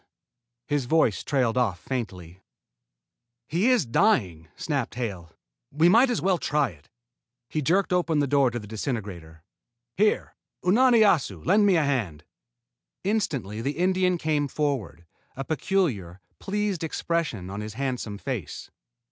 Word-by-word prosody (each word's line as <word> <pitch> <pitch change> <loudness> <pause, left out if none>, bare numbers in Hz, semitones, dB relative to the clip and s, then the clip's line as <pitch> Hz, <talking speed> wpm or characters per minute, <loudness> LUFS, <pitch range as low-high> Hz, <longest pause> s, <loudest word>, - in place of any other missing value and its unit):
His 145 -3 -1
voice 125 -6 +2
trailed 125 -4 +1
off 100 -8 0
faintly. 95 -9 -6 1.1
"He 185 +10 +1
is 245 - +3
dying," 110 - +1
snapped 140 -8 -3
Hale. 100 -9 -5 0.4
"We 160 +4 +3
might 235 +7 +5
as 240 - -1
well 185 -2 +2
try 150 -1 +1
it." 75 -4 -21 0.6
He 155 - -2
jerked 180 +6 +1
open 175 -3 +1
the 145 - +2
door 140 -1 +3
to 120 - -5
the 105 - -7
disintegrator. 100 - -5 0.5
"Here, 210 +2 +1 0.3
Unani 235 +5 +5
Assu! 135 - +2
Lend 205 0 +4
a 170 -5 +3
hand!" 115 - -2 0.8
Instantly 135 - -1
the 140 +6 -3
Indian 185 0 +2
came 150 -3 0
forward, 130 - -3 0.3
a 135 - -4
peculiar, 145 - -1 0.2
pleased 200 -3 -2
expression 155 - -2
on 100 +1 -5
his 105 0 -7
handsome 125 -5 -3
face. 105 - -6
140 Hz, 135 wpm, -26 LUFS, -, 1.1 s, might